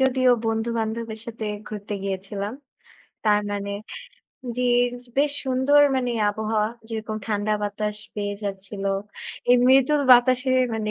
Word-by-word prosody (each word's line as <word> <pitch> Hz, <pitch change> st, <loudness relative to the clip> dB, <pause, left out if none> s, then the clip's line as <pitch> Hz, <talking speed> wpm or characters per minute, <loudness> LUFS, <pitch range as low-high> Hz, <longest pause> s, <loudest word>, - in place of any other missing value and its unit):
যদিও 260 Hz, -1 st, +3 dB, 0.2 s
বন্ধু-বান্ধবের 225 Hz, 0 st, -2 dB
সাথে 225 Hz, -2 st, -5 dB, 0.2 s
ঘুরতে 210 Hz, -1 st, -5 dB
গিয়েছিলাম। 195 Hz, +3 st, -4 dB, 0.7 s
তার 210 Hz, -1 st, +4 dB
মানে 200 Hz, 0 st, -3 dB, 0.8 s
জি, 250 Hz, -, 0 dB, 0.3 s
য -, -, -6 dB, 0.2 s
বেশ 285 Hz, 0 st, +3 dB
সুন্দর 265 Hz, +3 st, +4 dB, 0.2 s
মানে 250 Hz, -1 st, 0 dB, 0.2 s
আবহাওয়া 215 Hz, 0 st, -1 dB, 0.2 s
যেরকম 220 Hz, -1 st, -4 dB
ঠান্ডা 210 Hz, 0 st, 0 dB
বাতাস 210 Hz, +1 st, -2 dB, 0.2 s
পেয়ে 205 Hz, -1 st, -3 dB
যাচ্ছিল। 195 Hz, 0 st, -4 dB, 0.7 s
এই 250 Hz, -, +8 dB
মৃদুল 270 Hz, +3 st, +5 dB
বাতাসে 255 Hz, +1 st, +4 dB, 0.2 s
মানে 215 Hz, -1 st, -2 dB
220 Hz, 120 wpm, -24 LUFS, 205-250 Hz, 0.8 s, এই